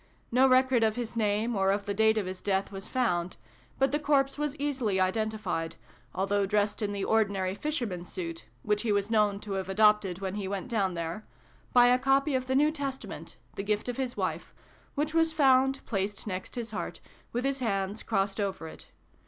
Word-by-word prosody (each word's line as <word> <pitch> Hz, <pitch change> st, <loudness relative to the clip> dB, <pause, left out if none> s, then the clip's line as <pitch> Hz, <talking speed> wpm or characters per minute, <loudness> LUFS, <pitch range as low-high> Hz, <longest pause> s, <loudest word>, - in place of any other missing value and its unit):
No 255 Hz, +3 st, +5 dB
record 255 Hz, -1 st, +4 dB
of 220 Hz, -1 st, +2 dB
his 240 Hz, -2 st, -4 dB
name, 220 Hz, +1 st, +1 dB
or 195 Hz, -1 st, +2 dB
of 200 Hz, +1 st, 0 dB
the 200 Hz, -, -1 dB
date 220 Hz, +1 st, +3 dB
of 210 Hz, -, 0 dB
his 185 Hz, 0 st, -6 dB
death, 195 Hz, 0 st, 0 dB
was 195 Hz, +1 st, -6 dB
found: 180 Hz, -9 st, 0 dB, 0.4 s
but 270 Hz, -1 st, +2 dB
the 295 Hz, -, +1 dB
corpse 275 Hz, -2 st, +2 dB
was 295 Hz, -1 st, -2 dB
easily 265 Hz, -9 st, -1 dB
identified, 190 Hz, -4 st, -1 dB, 0.4 s
although 195 Hz, +1 st, +1 dB
dressed 205 Hz, +1 st, 0 dB
in 205 Hz, -1 st, -1 dB
the 200 Hz, -1 st, -3 dB
ordinary 200 Hz, -4 st, +1 dB
fisherman 235 Hz, -, -3 dB
s 175 Hz, -, -10 dB
suit 165 Hz, -, -5 dB, 0.2 s
(which 210 Hz, 0 st, +1 dB
he 230 Hz, -, 0 dB
was 205 Hz, +1 st, 0 dB
known 210 Hz, -2 st, +3 dB
to 210 Hz, -, -7 dB
have 190 Hz, -1 st, -2 dB
adopted 210 Hz, -2 st, +3 dB
when 190 Hz, -1 st, -4 dB
he 200 Hz, -2 st, -3 dB
went 200 Hz, +4 st, -4 dB
down 195 Hz, -6 st, 0 dB
there], 170 Hz, +5 st, -4 dB, 0.4 s
by 245 Hz, -1 st, +7 dB
a 250 Hz, +1 st, +5 dB
copy 270 Hz, +3 st, +2 dB
of 255 Hz, -1 st, -1 dB
the 260 Hz, -, 0 dB
New 300 Hz, +3 st, +4 dB
Testament, 275 Hz, -3 st, -6 dB, 0.2 s
the -, -, -4 dB
gift 210 Hz, +2 st, -1 dB
of 245 Hz, -, -3 dB
his 260 Hz, -2 st, -3 dB
wife, -, -, -3 dB, 0.4 s
which 300 Hz, +2 st, -1 dB
was 325 Hz, -1 st, +3 dB
found, 270 Hz, -2 st, +3 dB
placed 200 Hz, -1 st, -2 dB
next 185 Hz, -3 st, -5 dB
his 230 Hz, -2 st, -4 dB
heart, -, -, -5 dB, 0.3 s
with 245 Hz, +2 st, -2 dB
his 275 Hz, 0 st, 0 dB
hands 200 Hz, -3 st, -1 dB
crossed 195 Hz, -2 st, -1 dB
over 195 Hz, -5 st, -2 dB
it. -, -, -12 dB
215 Hz, 200 wpm, -29 LUFS, 195-255 Hz, 0.4 s, by